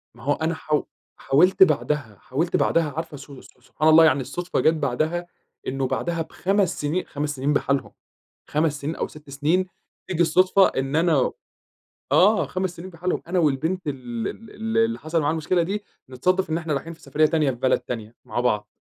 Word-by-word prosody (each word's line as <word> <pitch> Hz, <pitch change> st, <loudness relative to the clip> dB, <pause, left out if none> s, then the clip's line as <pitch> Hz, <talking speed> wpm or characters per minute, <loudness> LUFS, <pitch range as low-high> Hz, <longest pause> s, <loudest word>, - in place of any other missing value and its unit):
ما 120 Hz, -, -15 dB
هو 145 Hz, +1 st, +2 dB
أنا 160 Hz, +1 st, -1 dB
حاو 155 Hz, -1 st, -1 dB, 0.3 s
حاولت 185 Hz, +7 st, +5 dB
بعدها، 145 Hz, -, 0 dB
حاولت 160 Hz, +7 st, -1 dB
بعدها، 160 Hz, -4 st, +2 dB
عارفة 160 Hz, -2 st, -5 dB
سو 140 Hz, -1 st, -12 dB
سو 125 Hz, -, -20 dB
سبحان 155 Hz, +5 st, -1 dB
الله 160 Hz, +1 st, +8 dB
يعني، 145 Hz, -4 st, +3 dB
الصُدفة 175 Hz, +7 st, -3 dB
جت 160 Hz, -, +4 dB
بعدها، 155 Hz, +4 st, -1 dB, 0.4 s
إنّه 135 Hz, 0 st, -1 dB
بعدها 165 Hz, +5 st, -2 dB
ب5 190 Hz, +2 st, 0 dB
سنين، 155 Hz, +5 st, -1 dB
5 145 Hz, 0 st, -3 dB
سنين 140 Hz, +3 st, 0 dB, 1.0 s
بحالهم، 150 Hz, -1 st, 0 dB
سنين 150 Hz, +3 st, -3 dB
أو -, -, -2 dB
6 150 Hz, -2 st, -14 dB
سنين، 155 Hz, +7 st, +1 dB, 0.4 s
تييجي 175 Hz, -2 st, +1 dB
الصُدفة 185 Hz, +4 st, +4 dB
إن 135 Hz, +3 st, -2 dB
أنا 160 Hz, -5 st, +3 dB, 0.8 s
آه، 195 Hz, +8 st, +5 dB
5 185 Hz, -1 st, -2 dB
سنين 185 Hz, +3 st, -8 dB
بحالهم، 175 Hz, +2 st, -2 dB
إن -, -, -22 dB
أنا 180 Hz, +1 st, 0 dB
والبنت 160 Hz, +4 st, 0 dB
ال 125 Hz, -5 st, -4 dB
ال 225 Hz, -1 st, -9 dB
ال 225 Hz, +1 st, -4 dB
اللي 225 Hz, 0 st, +2 dB
حصل 160 Hz, +1 st, -1 dB
معاها 145 Hz, -, +1 dB
المشكلة 165 Hz, +2 st, +1 dB
دي، 205 Hz, +4 st, -3 dB, 0.3 s
نتصادف 180 Hz, +8 st, 0 dB
إن 160 Hz, -, +1 dB
إحنا 160 Hz, -3 st, -2 dB
رايحين 165 Hz, +4 st, -4 dB
في 160 Hz, -, -15 dB
سفرية 150 Hz, +3 st, +2 dB
تانية 155 Hz, -3 st, +1 dB
في 125 Hz, -, -5 dB
بلد 130 Hz, +1 st, +2 dB
تانية 115 Hz, -2 st, -6 dB
مع 120 Hz, -, -3 dB
بعض، 105 Hz, -4 st, 0 dB
155 Hz, 190 wpm, -24 LUFS, 140-175 Hz, 1.0 s, الله